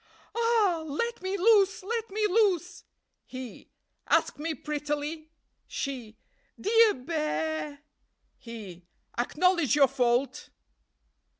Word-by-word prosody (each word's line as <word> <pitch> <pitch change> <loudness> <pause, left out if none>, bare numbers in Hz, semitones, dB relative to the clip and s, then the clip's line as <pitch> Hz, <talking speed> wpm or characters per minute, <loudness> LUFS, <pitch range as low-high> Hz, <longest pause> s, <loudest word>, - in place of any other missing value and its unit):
_ - - -35 0.3
'Ah! 455 -7 +2
Let 465 +11 -2
me 380 +2 -2
loose! 395 -1 +4
let 455 +3 -3
me 425 +2 0
loose!' 370 -4 +1 0.4
"He. 255 -2 -9 0.4
'Ask - - +2
me 320 +1 -2
prettily.' 295 +2 -4 0.4
"She. 245 -6 -5 0.4
'Dear 450 +1 +5
Bear!' 305 +1 -3 0.6
"He. 200 -7 -10 0.3
'Acknowledge 300 +1 +2
your 280 -2 +6
fault.' 250 0 0
315 Hz, 100 wpm, -28 LUFS, 275-395 Hz, 0.6 s, your